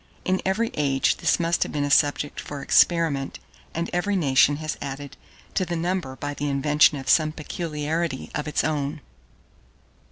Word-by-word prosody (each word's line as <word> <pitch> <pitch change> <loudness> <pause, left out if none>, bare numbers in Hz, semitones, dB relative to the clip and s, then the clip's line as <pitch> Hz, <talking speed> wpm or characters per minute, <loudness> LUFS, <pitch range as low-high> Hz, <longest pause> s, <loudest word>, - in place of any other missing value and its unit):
In 185 0 +1
every 225 +4 0
age 135 -2 +1
this - - +1
must 170 0 0
have - - 0
been 145 -1 -1
a 145 - -1
subject 145 0 +2
for 145 -1 -6
experiment, 160 -6 +2 0.4
and 170 +1 -1
every 190 +3 0
nation 145 -4 +4
has 155 +1 -4
added 140 0 -6 0.4
to - - +1
the 175 -1 -3
number 170 -5 -2
by 145 +2 -4
the 145 0 -3
invention 145 +2 +3
of 135 -1 -8
some 155 +3 +4
peculiarity 155 -1 -3
of 150 +1 -3
its 150 - 0
own. 150 0 -2
150 Hz, 165 wpm, -24 LUFS, 145-170 Hz, 0.4 s, nation